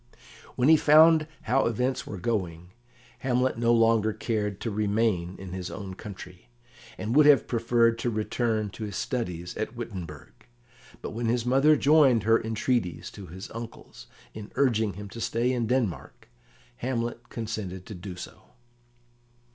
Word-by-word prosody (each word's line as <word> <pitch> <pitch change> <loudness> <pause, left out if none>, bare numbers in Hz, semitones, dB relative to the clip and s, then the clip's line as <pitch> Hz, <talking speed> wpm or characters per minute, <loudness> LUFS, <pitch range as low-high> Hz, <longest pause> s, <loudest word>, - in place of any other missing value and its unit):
When 125 +1 +2
he 160 0 +7
found 155 +1 +6 0.2
how 130 +3 +2
events 125 +3 -1
were 100 - -6
going, 90 -4 -3 0.5
Hamlet 125 -2 0
no 115 0 +3
longer 115 -2 +3
cared 105 -2 -2
to 115 - -2
remain 100 -4 0
in 95 -1 -8
his 90 -1 -5
own 95 -1 -7
country, 95 -1 -11 0.5
and 110 +4 -3
would 150 0 +7
have 145 -2 +6
preferred 115 -1 +2
to 120 - -1
return 110 -1 -1
to 110 - -6
his 100 -1 -6
studies 90 -9 -3
at 110 +2 -4
Wittenberg; 90 -11 -8 0.6
but - - -4
when 115 +1 -3
his 120 0 0
mother 135 +5 +5
joined 140 -6 +4
her 115 +1 +3
entreaties 110 -4 -2
to 100 -3 -10
his 95 +3 -9
uncle's, 115 0 -9 0.3
in 105 -1 -9
urging 110 -7 +2
him 100 +2 -8
to 115 - -8
stay 120 +3 0
in 120 -3 -1
Denmark, 110 - -2 0.5
Hamlet 120 - -3
consented 105 -5 -5
to - - -8
do 90 0 -8
so. 90 - -12
115 Hz, 155 wpm, -27 LUFS, 100-125 Hz, 0.6 s, he